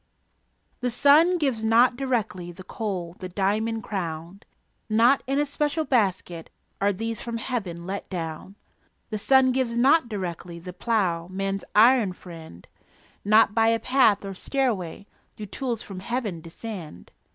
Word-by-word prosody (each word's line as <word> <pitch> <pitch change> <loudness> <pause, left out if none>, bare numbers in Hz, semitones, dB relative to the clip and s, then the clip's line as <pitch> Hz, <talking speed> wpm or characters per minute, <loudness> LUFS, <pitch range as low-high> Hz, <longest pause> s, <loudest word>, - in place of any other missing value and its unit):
The 250 - -1
sun 295 +8 +5
gives 265 -9 -1
not 235 +3 +4
directly 230 -9 -2
The 185 +2 -12
coal, 180 -4 -4
the 185 - -6
diamond 215 +4 -1
crown; 170 -2 -5 0.5
Not 235 +5 +4
in 275 +1 0
a 295 - +2
special 295 +2 -1
basket 190 - 0 0.3
Are 200 +1 +3
these 225 +3 -4
from 235 -1 -4
Heaven 195 -9 -4
let 195 +2 -5
down. 170 +1 -6 0.6
The 215 - -2
sun 265 +3 +4
gives 250 -2 -1
not 270 +2 +4
directly 175 -4 -5
The 180 +2 -9
plough, 180 -5 0
man's 195 +1 -3
iron 225 -2 +5
friend; 165 - -12 0.6
Not 215 0 +5
by 225 0 +3
a 230 0 +3
path 245 -7 +3
or 195 - -5
stairway 200 - -2 0.3
Do 215 - -7
tools 235 +2 -4
from 195 -2 -8
Heaven 210 -4 -3
descend. 165 - -9
215 Hz, 145 wpm, -25 LUFS, 180-245 Hz, 0.6 s, sun